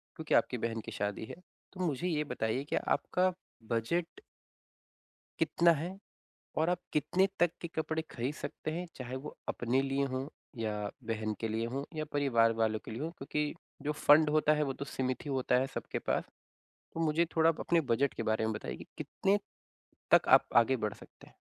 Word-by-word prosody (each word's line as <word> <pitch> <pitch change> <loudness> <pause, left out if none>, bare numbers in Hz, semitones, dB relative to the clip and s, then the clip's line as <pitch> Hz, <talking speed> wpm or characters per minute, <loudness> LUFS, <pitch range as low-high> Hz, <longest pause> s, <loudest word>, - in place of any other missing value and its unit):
क्योंकि 160 -3 -3
आपकी 125 - +3
बहन 115 -1 -2
की - - -6
शादी 105 +1 -2
है। - - -8 0.4
तो 185 - -12
मुझे 155 +1 -1
ये 155 -4 +1
बताइए 125 -3 -1
कि - - +2
आपका 185 +1 +1 0.4
बज़ट 165 - -1 1.2
कितना 170 0 +4
है? 170 +5 -4 0.6
और 160 +2 +3
आप 180 -1 +1
कितने 180 +6 +3
तक 175 -1 +4
के 170 - -3
कपड़े 160 -1 -2
खरीद 125 +4 -2
सकते 155 - -5
हैं? 175 +3 -3
चाहे 130 0 -5
वो 135 +3 -7
अपने 125 +3 +1
लिए 135 0 0
हों 130 +1 -2 0.3
या 110 -2 -1 0.4
बहन 110 -1 -1
के 115 - -1
लिए 110 +1 -1
हों 135 +1 -1
या 155 - -1
परिवार 120 -6 +4
वालों 110 -1 +2
के - - -7
लिए 115 +4 -5
हों 160 - -1
क्योंकि 150 -1 -2 0.3
जो 150 - -1
फंड 150 +1 +6
होता 155 0 +4
है, 150 0 +2
वो 135 -2 -1
तो 140 - -6
सिमित 130 -1 -2
ही - - -4
होता 130 -1 +2
है 130 - 0
सबके - - -3
पास। - - 0 0.7
तो - - -5
मुझे 165 +1 +3
थोड़ा 160 0 +6
आप 165 - -1
अपने 170 -1 +3
बज़ट 135 +4 +2
के - - -3
बारे 110 0 +1
में 110 - 0
बताइए 65 -11 -6
कितने 200 +1 +1 0.7
तक - - +7
आप - - +7
आगे 120 +3 +5
बढ़ 105 -3 -1
सकते - - -16
हैं? - - -20
140 Hz, 195 wpm, -32 LUFS, 115-160 Hz, 1.2 s, तक